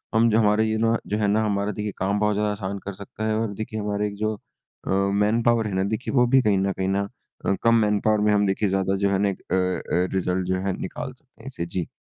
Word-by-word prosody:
हम 115 +1 +5
जो 110 +1 +3
हमारे 110 +1 +3
इनो 115 +1 +2
जो 105 - -1
है 105 - +1
ना 105 +2 +2
हमारा 100 0 0
देखिए 105 +1 -4
कम 100 +2 0
बहुत 105 0 +2
ज़्यादा 105 0 +1
आसान 100 -1 -4
कर 100 - -4
सकता 100 +3 -6
है 110 - +1
और 110 -3 -2
देखिए 110 +1 -5
हमारे 105 0 -1
एक 100 - -6
जो 110 +1 0 0.5
अ, - - -3
मैनपावर 105 +4 +2
है 100 - -4
ना 95 - +1
देखिए 125 - -5
वो 125 -2 +5
भी 135 +2 +5
कहीं 105 -4 +2
न 100 0 +1
कहीं 95 0 -2
ना 100 +1 0 0.4
अ, - - +2
कम 115 0 +5
मैनपावर 105 -1 +2
में 105 0 +3
हम 105 0 +3
देखिए 95 +1 +1
ज़्यादा 95 0 +1
जो 100 - +3
है 100 +1 +1
एक - - -10
अ - - +3
अ, 90 -1 0
रिज़ल्ट 95 -1 0
जो 95 - +1
है 95 - +1
निकाल - - -5
सकते - - -23
हैं - - -11
इससे 85 - -4
जी। 85 0 -3
105 Hz, 260 wpm, -24 LUFS, 95-110 Hz, 0.5 s, हम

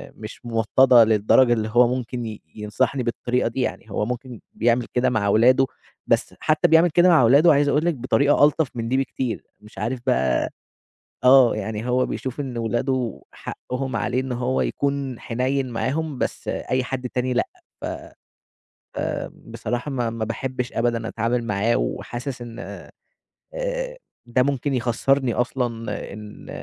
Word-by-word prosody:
مش 110 +3 -10
موطَّدَة 120 +2 +5
للدرجة 110 +3 +4
اللي 110 -1 -1
هو 120 +1 +5
ممكن 125 -1 -4
ي 110 -1 -7
ينصَحني 120 +5 -1
بالطريقة 120 +1 -1
دي 125 +3 -2
يعني، 110 -3 -4
هو 105 - -1
ممكن 125 -1 -5
بيعمل 120 +1 +2
كده 125 +1 +2
مع 110 -4 0
ولاده، 125 +6 +5 0.4
بس - - +1
حتى 155 -1 +2
بيعمل 165 +2 +5
كده 175 +3 +4
مع 160 -8 +6
ولاده 145 +7 +6
عايز 145 0 +3
اقول 150 +4 +2
لِك 170 -3 +1
بطريقة 140 +3 +2
ألطف 150 -2 +1
من 115 0 -3
دي 130 - +2
بكتير، 130 -3 -2 0.2
مش 105 +1 -17
عارف 125 +1 -2
بقى 65 - +2 0.7
آه 130 -3 +7
يعني 110 +2 -4
هو 125 +1 +2
بيشوف 130 +2 -5
إن 130 -4 -4
ولاده 120 +2 -1
حقّهم 130 -1 -5
عليه 125 +4 0
إن 130 -1 -5
هو 125 +1 0
يكون 140 -3 -2
حنيّن 130 +2 -1
معاهم 140 +5 -2
بس - - -3
أي 130 0 -1
حد 125 -1 -4
تاني 125 0 -1
لأ، 125 - +1 0.3
ف - - -4
ف - - -8 0.7
آمم - - -3 0.2
بصراحة 120 +5 -3
ما 120 -4 -1
ما 115 -1 -3
باحبّش 125 +2 -4
أبدًا 115 -1 0
اتعامل 115 +2 -1
معاه 115 +2 +1
وحاسس 125 0 -4
إن 115 -1 -9 1.0
آآ - - -3 0.3
ده 125 +1 +2
ممكن 140 0 -1
يخسّرني 125 +1 +1
أصلًا 125 0 0 0.5
إن 105 0 -11
125 Hz, 160 wpm, -23 LUFS, 115-135 Hz, 1.0 s, آه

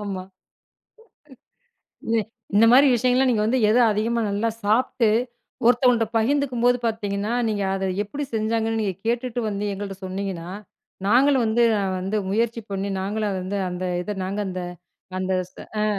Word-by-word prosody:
ஆமா. 190 -2 -4 1.8
இது, 225 0 +2 0.4
இந்த 225 +2 +7
மாரி 275 +3 +7
விஷயங்கள்லாம், 255 +2 +2
நீங்க 210 -2 +1
வந்து 255 +3 +2
எத 230 - +4
அதிகமா 230 +3 0
நல்லா 210 +3 0
சாப்பிட்டு, 225 +1 +2 0.6
ஒருத்தவங்கள்ட்ட 245 -2 +4
பகிர்ந்துக்கும்போது 245 0 +2
பார்த்தீங்கன்னா, 205 0 -2 0.2
நீங்க 205 -2 -1
அத 190 0 -1
எப்டி 280 +8 -5
செஞ்சாங்கன்னு 225 +1 0
நீங்க 195 -4 -1
கேட்டுட்டு 245 +1 -1
வந்து, 200 0 -3
எங்கள்ட்ட 195 -1 -6
சொன்னீங்கன்னா, 185 -2 -4 0.6
நாங்களும் 260 +2 +4
வந்து 230 +2 +2 0.4
வந்து 195 +4 -2
முயற்சி 230 +2 0
பண்ணி 195 +1 -2
நாங்களும் 210 +1 -1
அத 190 - -2
வந்து, 200 +2 -3
அந்த 180 +1 -5 0.2
இதை 210 +1 -4
நாங்க 200 +2 -2
அந்த 185 0 -4 0.6
அந்த 190 0 -1 0.2
ஸ் - - -35 0.3
அ. - - +2
220 Hz, 145 wpm, -23 LUFS, 200-240 Hz, 1.8 s, இந்த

